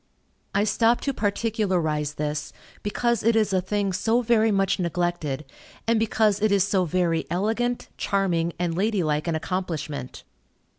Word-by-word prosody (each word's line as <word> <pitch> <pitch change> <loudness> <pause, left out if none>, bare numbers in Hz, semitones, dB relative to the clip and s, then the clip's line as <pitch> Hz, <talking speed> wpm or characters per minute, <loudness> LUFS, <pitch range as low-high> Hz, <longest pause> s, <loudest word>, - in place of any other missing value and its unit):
I 200 - +3
stop 225 +3 +3
to 275 - -1
particularize 190 - 0
this, 150 0 -3 0.3
because 235 +2 0
it 230 +1 +3
is 215 -3 +2
a 185 - +3
thing 200 +1 -1
so 230 +6 +2
very 225 -1 +3
much 195 -1 +1
neglected, 170 -5 -1 0.4
and 230 -1 +2
because 215 -2 +2
it 215 -1 +3
is 200 -2 +4
so 195 -2 +1
very 170 -1 0
elegant, 225 +7 -1
charming, 175 -4 0
and 170 -2 -1
lady 200 0 +1
like 150 +1 0
an 165 - 0
accomplishment. 155 -6 -4
195 Hz, 150 wpm, -25 LUFS, 165-220 Hz, 0.4 s, is